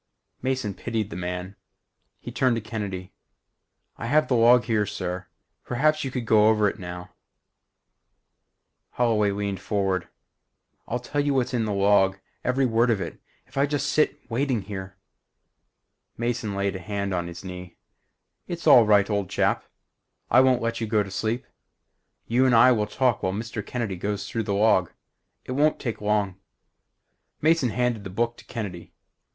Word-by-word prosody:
_" - - -36
Mason 130 -6 -1
pitied 110 0 -3
the - - -6
man. 90 +2 -4 0.6
He - - -8
turned 130 -2 +2
to - - -1
Kennedy. 100 -4 -5 0.9
"I 115 - -4
have 150 +4 +3
the - - 0
log 120 +1 +6
here, 110 -3 0
sir. 90 0 -4 0.4
Perhaps 155 +5 +1
you 135 - -2
could 125 -2 -4
go 110 -1 +5
over 105 -1 +3
it 105 - -3
now 90 -1 -7 0.9
" - - -53
Holloway 110 -4 +2
leaned 100 -1 -2
forward. 95 -3 -1 0.8
"I'll 120 - -1
tell 135 +4 -2
you 145 -1 0
what's 130 -1 0
in 115 -3 +1
the 105 - -2
log. 100 -1 +3 0.3
Every 130 +2 +2
word 115 0 +2
of 110 -4 +2
it. 85 - -6 0.2
If - - -15
I 140 - +3
just 145 -1 -1
sit 155 - +4
here - - -31
waiting 110 -7 -2 0.6
" - - -52
Mason 115 -3 -2
laid 100 -1 -1
a - - -4
hand 100 +1 -3
on 85 -1 -1
his 85 +1 -9
knee. 90 -1 -8 0.7
"It's 170 -1 -5
all 125 -8 +8
right, 100 -1 +5
old 100 -4 -1
chap. - - +1 0.7
I 130 - +7
won't 130 -2 +3
let 115 0 -2
you 115 - -1
go 105 -1 +2
to 95 - -10
sleep. 110 +4 -2 0.8
You 125 +3 +3
and 125 - +4
I 120 +3 +7
will 105 -4 +1
talk 120 +1 +1
while 95 - -1
Mr. 110 +1 -4
Kennedy 110 -6 -3
goes 100 +3 -3
through 115 -2 -3
the 100 - -1
log. 100 -4 +3 0.5
It - - -6
won't 150 +4 +2
take 115 -5 -4
long." 105 -3 0 1.0
Mason 160 -4 +3
handed 120 -2 -1
the 95 - -6
book 115 +5 -1
to - - -15
Kennedy. 100 -8 -6
110 Hz, 175 wpm, -25 LUFS, 100-125 Hz, 1.0 s, all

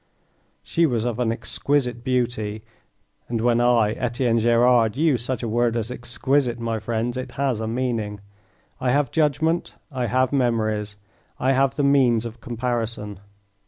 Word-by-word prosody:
She 165 0 +2
was 120 -4 -1
of 120 -1 -2
an 120 -2 +1
exquisite 125 0 -1
beauty 120 -4 -1 0.7
and 120 -1 -1
when 120 +1 +2
I, 120 -3 +3
Etienne 120 -1 0
Gerard, 120 0 +3
use 145 -7 +2
such 130 0 -3
a - - -1
word 120 +1 +1
as 115 +1 -3
"exquisite," 125 +1 0
my 115 -1 -2
friends, 115 +3 -2
it 130 -1 -6
has 135 -5 -1
a 110 - -3
meaning. 115 -4 -2 0.6
I 130 - 0
have 140 0 +1
judgment, 160 +2 0 0.2
I 125 -3 -2
have 130 +2 +1
memories, 110 -5 0 0.4
I 130 - +2
have 135 0 +2
the 145 - 0
means 130 -5 +3
of 115 0 -8
comparison. 115 -4 -3
120 Hz, 155 wpm, -23 LUFS, 115-130 Hz, 0.7 s, I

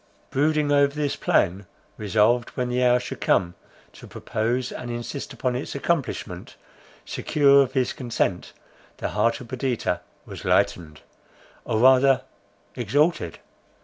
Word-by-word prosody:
Brooding 150 +1 +1
over 140 0 +3
this 150 -2 -1
plan, 95 +1 +1 0.3
resolved 110 +3 +2
when 125 -1 -1
the 125 +1 0
hour 125 0 +4
should - - -7
come, 85 -1 +2 0.4
to - - -13
propose, 120 +3 -2
and 120 - -7
insist 120 +4 -5
upon 125 -1 -2
its 130 - -5
accomplishment, 135 - -3 0.5
secure 140 -2 +3
of 130 -1 -1
his 130 -3 0
consent, 115 -7 -2 0.5
the - - -3
heart 110 +3 +1
of 125 - -10
Perdita 130 -1 -2 0.2
was - - -9
lightened, 75 -4 0 0.6
or 110 - -1
rather 130 +2 +5 0.5
exalted. 145 - 0
125 Hz, 130 wpm, -24 LUFS, 110-140 Hz, 0.6 s, rather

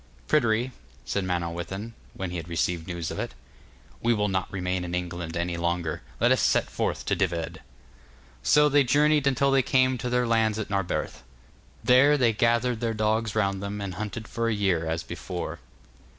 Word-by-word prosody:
'Pryderi,' 120 -4 +2 0.3
said 100 -2 -1
Manawyddan, 90 +5 -3 0.2
when 95 -2 -4
he 90 - -3
had 85 -1 -6
received 85 0 -1
news 85 -2 -4
of - - -5
it, - - -4 0.7
'we 120 0 +3
will 105 -1 +1
not 95 -1 -1
remain 90 -1 -2
in 90 0 -3
England 85 -2 -4
any 85 0 -1
longer. 85 -1 -1 0.2
Let - - +4
us - - +4
set - - +2
forth - - -2
to - - +1
Dyved.' 85 -3 -2 0.8
So 150 0 +5
they 145 -1 +4
journeyed 145 +2 +3
until 140 +1 +3
they 135 0 +5
came 130 0 +2
to 125 - -2
their 125 0 +2
lands 110 -2 +2
at 110 -2 -4
Narberth. 95 -3 -2 0.6
There 140 +4 +6
they 120 -4 +3
gathered 120 +2 +2
their 115 -1 -1
dogs 110 0 0
round 100 -3 +1
them, 100 +1 -4
and 100 -2 -4
hunted 110 +3 -5
for 115 0 -2
a - - +1
year 95 -5 +1
as 80 +1 -2
before. 90 +1 -5
105 Hz, 180 wpm, -26 LUFS, 90-120 Hz, 0.8 s, There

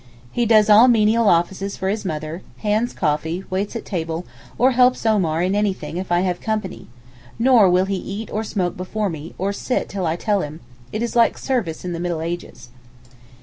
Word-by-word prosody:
He 240 -1 0
does 215 -2 +5
all 215 +4 +8
'menial 225 -2 +4
offices' 190 +3 0
for 190 - -3
his 210 +2 -1
mother, 155 -1 -4 0.2
hands 215 +4 +1
coffee, 160 +3 -1
waits 200 +4 -2
at 230 - -5
table 165 -2 -3 0.3
or 255 +2 +4
helps 250 -1 +3
Omar 175 -7 +2
in 185 +2 +1
anything 200 -4 -1
if 185 -1 -5
I 175 0 +3
have 180 -1 -1
company, 215 -4 -3 0.5
nor 230 -4 +5
will 180 +1 +3
he 195 0 -2
eat 200 +4 -6
or 215 - -2
smoke 185 -5 -2
before 195 +2 -3
me, 160 0 -8
or 195 +2 -1
sit 250 - -2
till 190 -3 -2
I 160 - 0
tell 205 +2 0
him—it 125 - -7
is 235 - -3
like 235 -1 +4
service 220 -12 -2
in 180 - -3
the 165 - -4
middle 170 -2 -2
ages. 165 -7 -6
190 Hz, 190 wpm, -21 LUFS, 170-215 Hz, 0.5 s, all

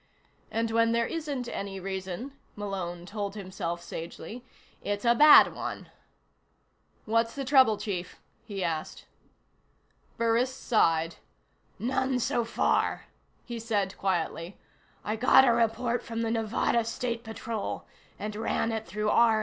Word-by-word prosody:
And 225 0 -1
when 230 0 +3
there 235 0 +2
isn't 290 -6 -3
any 195 -3 -5
reason, 190 +6 -5 0.2
Malone 185 -4 -4
told 205 +1 -4
himself 185 -4 -4
sagely, 170 +8 -7 0.4
it's 205 +2 -3
a 235 - +6
bad 300 +5 +8
one. - - -6 1.2
"What's 230 +1 +1
the 275 -1 -3
trouble, 260 -5 +5
Chief?" 180 -4 -5 0.2
he 200 -3 -4
asked. 160 -2 -3 1.1
Burris 230 +2 +2
sighed. 165 -11 +1 0.6
"None 260 +1 0
so 240 0 0
far," 230 - 0 0.4
he 235 -1 -5
said 205 -4 -1
quietly. 175 -1 -2 0.5
"I 215 - -1
got 255 +3 +6
a 235 - +5
report 235 +1 +1
from 230 0 -4
the 225 - 0
Nevada 225 +1 +1
State 235 +1 -3
Patrol, 220 -1 -4 0.3
and 210 0 -5
ran 225 +1 0
it 220 -1 -3
through 210 +4 -1
R&I. 225 -2 +5
225 Hz, 130 wpm, -28 LUFS, 195-235 Hz, 1.2 s, bad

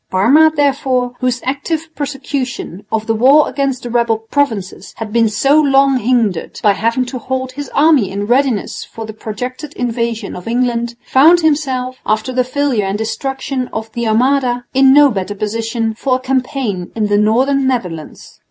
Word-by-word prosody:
Parma, 275 +12 +4
therefore, 265 -4 0
whose 250 -1 -1
active 310 +4 -3
prosecution 270 - -4
of 220 -1 -1
the 225 - 0
war 270 +7 +5
against 275 -2 -2
the 240 - -5
rebel 235 -2 +1
provinces 225 -4 -3
had 220 -2 -6
been 230 -1 +3
so 275 +8 +3
long 275 -2 +3
hindered 225 -7 0
by 205 - +5
having 230 +5 0
to 255 +1 -6
hold 260 +1 -3
his 285 0 -7
army 290 - +3
in 200 +1 -3
readiness 245 -2 0
for 225 - -9
the 220 - -8
projected 250 +7 -6
invasion 230 -3 -3
of 180 - -9
England, 235 0 -1
found 325 +6 +5
himself, 265 -5 -1
after 215 +4 -1
the 255 0 +2
failure 255 -4 -1
and 195 +1 -2
destruction 260 +4 -3
of 220 0 -5
the 235 0 -3
Armada, 245 +2 +1
in 270 0 +5
no 290 0 +6
better 200 -1 -3
position 225 +2 -2
for 255 +3 0
a - - -1
campaign 255 -7 -2
in 220 -2 0
the 205 0 +1
northern 260 +6 +2
Netherlands. 180 -12 -4
250 Hz, 170 wpm, -16 LUFS, 220-270 Hz, -, no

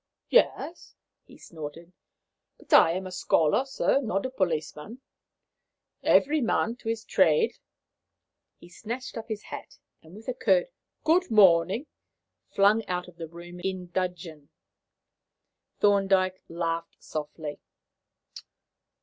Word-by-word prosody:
"Yes," 355 -7 +1 0.3
he - - -16
snorted; 165 +2 -10 0.6
"but - - -7
I 165 - +7
am 185 +2 -4
a 185 - -7
scholar, 180 - +2
sir, 275 0 +1
not 195 -5 -2
a 260 - -3
policeman. 170 +1 -3 1.0
Every 295 +2 +3
man 230 -1 0
to 225 - -6
his 225 -1 -3
trade." 460 -1 +2 1.0
He - - -15
snatched 235 +8 -7
up 225 -1 -6
his 215 -2 -5
hat, - - -9 0.2
and 160 +3 -15
with 220 +2 -13
a 255 - -1
curt - - +2 0.3
"Good 350 +4 +3
morning," 195 - +5 0.6
flung 205 +3 +3
out 180 0 -3
of 175 -1 -15
the 165 - -6
room 175 +2 -11
in 185 -1 -4
dudgeon. 175 -5 -4 1.3
Thorndyke 195 -2 +3
laughed 165 0 -3
softly. 150 0 -6
185 Hz, 120 wpm, -27 LUFS, 170-225 Hz, 1.3 s, I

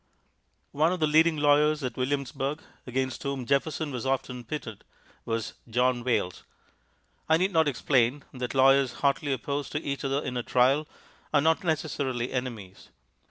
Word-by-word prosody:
One 155 +4 +2
of 185 - -2
the 155 - +3
leading 160 +1 +4
lawyers 150 +1 +3
at 125 - -3
Williamsburg, 140 +2 -2 0.2
against 130 0 -2
whom 140 -2 -3
Jefferson 145 +3 0
was 125 -3 -4
often 130 -2 -2
pitted, 115 -5 -6 0.4
was 115 -2 -3 0.2
John 125 +1 +1
Wayles. 115 -7 -1 0.9
I 160 - +6
need 185 +3 +1
not 160 -3 +3
explain 130 0 +1
that 125 0 -4
lawyers 135 -1 +5
hotly 140 +1 +1
opposed 140 +2 -3
to 150 - -1
each 140 -1 -3
other 135 +1 0
in 125 -1 -3
a - - 0
trial 130 +5 +2 0.4
are 145 - +4
not 160 +5 +2
necessarily 140 -7 -1
enemies. 115 -7 -5
135 Hz, 155 wpm, -27 LUFS, 125-150 Hz, 0.9 s, I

